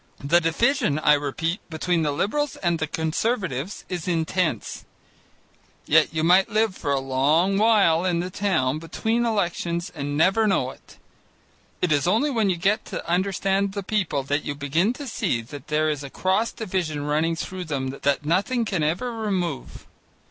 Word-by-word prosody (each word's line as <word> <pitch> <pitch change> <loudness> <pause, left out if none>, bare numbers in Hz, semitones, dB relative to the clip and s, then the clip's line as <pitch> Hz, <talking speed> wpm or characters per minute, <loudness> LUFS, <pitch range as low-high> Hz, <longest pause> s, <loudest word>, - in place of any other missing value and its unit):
The 170 +5 +4
division, 165 - +1
I 150 -1 +4
repeat, 150 +5 -1
between 165 +1 0
the 150 -2 +1
Liberals 285 - -1
and 170 -2 -1
the 160 - -1
Conservatives, 165 - -2
is 180 -2 -5
intense. 165 - -1 1.0
Yet - - +4
you 160 0 -1
might 180 +3 +5
live 215 -2 +1
for 140 - -3
a 140 - +2
long 150 +9 +2
while 205 -7 +4
in 180 -2 +1
the 180 +2 -3
town, 155 -9 0
between 225 +9 -1
elections, 175 -4 -1
and 145 -2 -3
never 195 +7 +3
know 195 - +1
it. - - -18 0.9
It 180 - +2
is 145 +1 +2
only 230 +11 +2
when 220 -6 +1
you 180 - 0
get 200 +5 +1
to - - -6
understand 195 +2 0
the 200 -1 -4
people 185 -9 -1
that 145 +2 -1
you 145 - -4
begin 150 +9 +1
to 285 +3 -8
see 120 - -1
that 145 +5 -10
there 155 +1 +1
is 150 -2 -2
a 140 - -7
cross 190 +9 0
division 180 -8 -3
running 155 +3 0
through 185 +2 -5
them 135 -4 -2
that 140 +2 -1
nothing 200 - +1
can 190 -6 -1
ever 170 +11 -1
remove. 190 - -3
170 Hz, 170 wpm, -24 LUFS, 150-200 Hz, 1.0 s, might